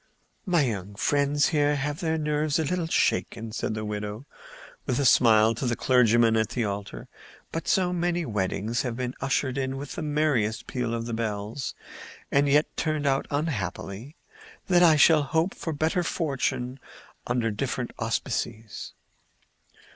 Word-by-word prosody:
"My 175 -4 +3
young 100 -5 -3
friends 145 +5 +2
here 150 -2 +2
have 145 +2 -2
their 160 -1 0
nerves 150 -1 0
a 160 - +1
little 175 +2 -1
shaken," 115 -8 0
said 110 - -3
the 110 0 -4
widow, 105 +3 -5 0.6
with 125 -3 0
a 140 - +1
smile, 110 -3 +5
to 120 +3 -3
the 120 - +1
clergyman 120 -2 +4
at 110 -1 +1
the 120 - -1
altar. 100 0 -5 0.4
"But 165 - -4
so 180 -2 +2
many 175 -1 0
weddings 105 +1 -1
have 120 -3 -3
been 125 -1 -3
ushered 135 0 0
in 135 0 -2
with 140 +1 -6
the - - -5
merriest 145 -8 0
peal 120 -2 -2
of 115 0 -3
the 120 - -4
bells, 110 +2 -3 0.6
and 140 0 +3
yet 150 +2 +2
turned 155 -2 -1
out 135 -1 +1
unhappily, 130 - -3 0.5
that 175 -1 +5
I 165 -3 +7
shall 155 +1 +6
hope 160 +6 0
for 165 - -5
better 160 +4 0
fortune 135 -6 -2 0.5
under 120 -2 0
such 105 - -8
different 125 -1 -2
auspices." 115 -1 -3
130 Hz, 160 wpm, -26 LUFS, 115-150 Hz, 0.6 s, I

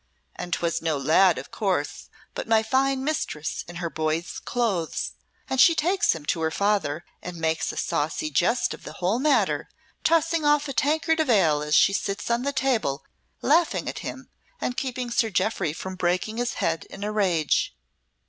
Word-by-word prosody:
And 175 - -6
'twas 170 -1 0
no 160 -2 0
lad, 165 +5 +4
of 130 - -8
course, 180 -8 -2 0.2
but - - -5
my 225 -1 +4
fine 265 +3 +1
mistress 265 - -2
in 175 - -9
her 170 -1 -3
boy's 160 +2 -2
clothes, 205 -10 -1 0.4
and 265 -1 +2
she 335 - +7
takes 355 - +2
him 155 -3 -9
to 165 - -1
her 160 - +1
father 180 -4 0 0.2
and 180 -1 -7
makes 160 0 0
a - - -10
saucy 155 -1 -1
jest 235 - +2
of - - -11
the - - -8
whole 185 +6 0
matter, 295 +2 +2 0.3
tossing 330 0 +2
off 295 0 +3
a 275 - -4
tankard 315 +6 +1
of 310 -4 +1
ale 165 -10 +4
as 150 0 +1
she 195 - +5
sits 200 +3 -2
on 235 +1 +2
the 280 +2 -1
table 245 - 0 0.4
laughing 325 +5 +2
at - - -4
him - - -7 0.3
and 245 - -2
keeping 250 -2 -3
Sir 235 -1 +2
Jeoffry 190 -3 0
from 190 +4 -6
breaking 185 +5 -1
his 240 0 -1
head 165 0 -1
in 195 - -9
a 210 - -2
rage. 180 -7 +1
200 Hz, 185 wpm, -25 LUFS, 165-260 Hz, 0.4 s, she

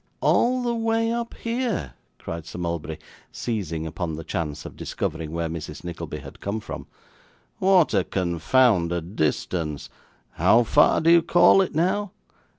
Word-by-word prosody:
'All 250 +1 +2
the 240 -1 0
way 225 0 +1
up 235 0 -3
here!' 230 - -2 0.2
cried 85 -1 -7
Sir - - -8
Mulberry, 85 -2 -3 0.3
seizing 90 -9 -3
upon 80 0 -4
the 80 - -7
chance 75 -2 -4
of - - -8
discovering 80 -1 -4
where 85 0 -2
Mrs. 80 -2 -7
Nickleby 85 -1 -6
had - - -12
come 100 +2 -3
from. 110 - -8 0.7
'What 185 -6 +4
a 95 -3 +3
confounded 85 0 +1
distance! 75 -1 -1 0.4
How 120 - +4
far 145 +6 +4
do 165 +1 +4
you 170 0 +7
call 175 +3 +5
it 185 - -2
now? 185 +4 0
95 Hz, 150 wpm, -24 LUFS, -, 0.7 s, you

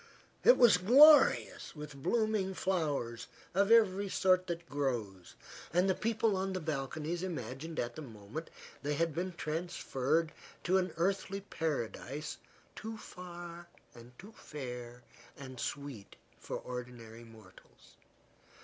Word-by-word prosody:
It - - +8
was 235 -7 +7
glorious 275 - +6
with 150 -1 -8
blooming 215 - +1
flowers 145 -12 -1 0.3
of 200 +3 +3
every 200 -3 +5
sort 185 -1 +3
that 170 -1 -4
grows, 120 - -3 0.4
and 180 +3 +3
the 190 - +4
people 220 0 +1
on 190 0 -1
the 185 - -2
balconies 155 +2 -3
imagined 155 -2 -5
at 120 0 -2
the 155 - -6
moment 115 +4 -8 0.3
they 145 +1 -1
had 165 +1 0
been 180 +3 -3
transferred 160 -2 -1 0.3
to 190 +2 +3
an 185 -1 -1
earthly 195 +3 0
paradise 150 - -4 0.4
too 220 0 -6
fair 175 -3 -9 1.7
and 130 -3 -9
sweet 140 -9 -5 0.2
for - - -5
ordinary 120 -2 -8
mortals. 110 -5 -17
165 Hz, 115 wpm, -33 LUFS, 135-190 Hz, 1.7 s, It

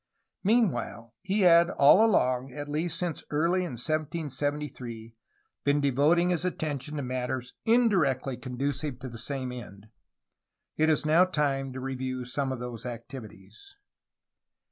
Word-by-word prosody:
Meanwhile, 185 - +1
he 200 +2 0
had 170 -1 +6
all 175 +5 +6
along, 130 - +2
at 145 +1 -6
least 160 +3 -1
since 175 -3 -3
early 165 +5 +1
in 180 -6 -3
1773, 145 -4 -3 0.5
been 145 +1 +3
devoting 145 +6 +3
his 175 -2 0
at 180 - -2
tention 150 -1 -4
to 145 - -2
matters 125 0 -3
indirectly 180 - +2
conducive 135 +2 -3
to 130 - -6
the 115 -1 -9
same 130 0 -4
end. 105 -4 -10 0.9
It 155 +1 +2
is 155 -1 +1
now 165 +4 +5
time 140 -6 -1
to 130 - -6
review 130 -1 -4
some 135 +2 -2
of 130 - -4
these 120 -2 -6
activities. 120 - -10
140 Hz, 140 wpm, -28 LUFS, 125-165 Hz, 0.9 s, had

